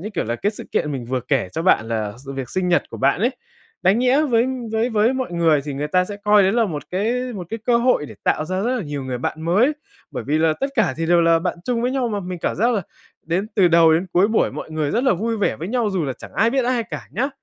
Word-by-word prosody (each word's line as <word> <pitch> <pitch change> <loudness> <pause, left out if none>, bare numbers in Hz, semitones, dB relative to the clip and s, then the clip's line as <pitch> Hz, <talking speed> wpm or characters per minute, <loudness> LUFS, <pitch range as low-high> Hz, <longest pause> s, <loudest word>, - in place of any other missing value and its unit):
như 210 +5 -6
kiểu - - -1
là 120 +2 -2
cái 205 - 0
sự - - -9
kiện 150 - 0
mình 130 -3 -4
vừa 130 0 -1
kể 125 -6 0
cho 165 - -3
bạn 115 -11 +3
là 110 -2 -2
sự 135 - -5
việc 135 -3 -5
sinh 185 -1 -1
nhật 175 - +2
của - - -7
bạn 140 +7 +2
ấy, 240 +4 +2 0.5
đáng 195 +5 +4
nhẽ 255 +4 +3
với 240 -4 +2 0.3
với 225 +3 +1
với 220 +3 +3
mọi 260 -8 -3
người 165 -4 +3
thì 145 -2 -4
người 145 +2 -3
ta 180 +3 +2
sẽ 205 +1 -7
coi 210 -1 +6
đấy 190 +2 +3
là 235 -1 +3
một 150 -6 -4
cái 240 +7 -1
một 180 -4 -6
cái 225 - -3
cơ 240 -1 +4
hội 235 - +2
để - - -11
tạo 155 - +1
ra 185 +1 -2
rất 250 +3 0
là 215 - -3
nhiều 145 -3 -5
người 125 -2 -3
bạn 160 +5 -4
mới, 210 - +3 0.4
bởi - - -5
vì 150 +3 +1
là 160 -1 +3
tất 275 - +1
cả 185 -11 +2
thì 165 0 -2
đều 175 0 +4
là 165 0 +4
bạn 170 - -3
chung 240 -2 -1
với 250 - +1
nhau 255 -3 0
mà. 205 -2 -2
Mình 180 -1 -6
cảm - - -1
giác 235 +6 +2
là 200 - -1 0.4
đến 180 +5 -1
từ 185 -3 +5
đầu 165 -1 +6
đến 175 +4 0
cuối 190 +4 +4
buổi 220 - +1
mọi - - -7
người 155 -2 -1
rất 240 +4 0
là 260 - +4
vui 225 +5 -2
vẻ 200 - 0
với 170 +4 -6
nhau, 235 -3 0
dù 180 -5 -1
là 135 - -2
chẳng - - -12
ai 225 +3 +3
biết 265 -1 +1
ai 245 -2 +1
cả - - -8
nhá, 265 +4 0
185 Hz, 300 wpm, -21 LUFS, 155-230 Hz, 0.5 s, coi